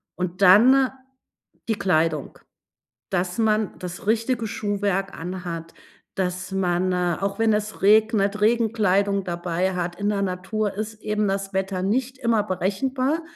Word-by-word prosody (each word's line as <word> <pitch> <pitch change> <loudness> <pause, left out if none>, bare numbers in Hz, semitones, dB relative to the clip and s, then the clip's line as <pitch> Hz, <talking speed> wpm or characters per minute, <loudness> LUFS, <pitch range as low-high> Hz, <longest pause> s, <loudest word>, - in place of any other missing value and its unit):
Und 180 +1 -4
dann 250 +8 +6 0.8
die 220 - +1
Kleidung, 160 -6 0 0.7
dass 180 -1 -1
man 215 -2 +1
das 180 +2 -7
richtige 230 +1 0
Schuhwerk 200 -2 -1
anhat, 170 -1 -6 0.4
dass 185 0 -3
man, 185 -1 0
äh, 180 -2 0
auch 195 +1 -2
wenn 225 -1 +3
es 210 -1 -2
regnet, 210 0 +3
Regenkleidung 210 -3 +2
dabei 175 +1 -2
hat. 175 -1 -3
In 205 +2 -1
der 205 -1 0
Natur 195 +3 -2
ist 215 +1 -6
eben 210 -1 0
das 195 0 -2
Wetter 190 -1 -2
nicht 255 +7 -1
immer 230 -4 +2
berechenbar. 255 - -1
200 Hz, 135 wpm, -23 LUFS, 180-215 Hz, 0.8 s, dann